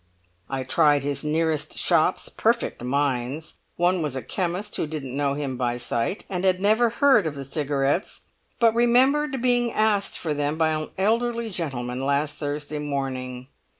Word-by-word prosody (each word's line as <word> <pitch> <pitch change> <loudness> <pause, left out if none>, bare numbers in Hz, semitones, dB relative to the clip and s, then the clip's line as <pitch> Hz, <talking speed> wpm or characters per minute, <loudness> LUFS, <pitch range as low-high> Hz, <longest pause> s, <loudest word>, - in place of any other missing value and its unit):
I 135 -1 -2
tried 145 +1 +3
his 145 +1 -2
nearest 155 -1 0
shops; - - +2
perfect - - 0
mines! 135 +2 -2 0.2
One 175 +1 +2
was 150 -4 -2
a 130 - -4
chemist, 185 +3 -3
who - - -1
didn't 140 -4 -5
know 140 -1 0
him 140 -3 -3
by 120 -1 -1
sight, 120 - -2
and 185 -1 -3
had 185 -1 +3
never 220 +4 +3
heard 235 - +4
of 150 - -4
the 140 - -5
cigarettes, 145 +3 -1 0.4
but 230 -2 +5
remembered 260 +3 +3
being 245 -1 +2
asked 215 -2 +1
for 160 -3 -2
them 145 +1 -1
by 160 -1 +3
an 155 0 -2
elderly 230 +3 0
gentleman 130 -7 -3
last 145 +2 0
Thursday 145 0 -4
morning! 130 -3 -4
150 Hz, 160 wpm, -24 LUFS, 140-200 Hz, 0.4 s, but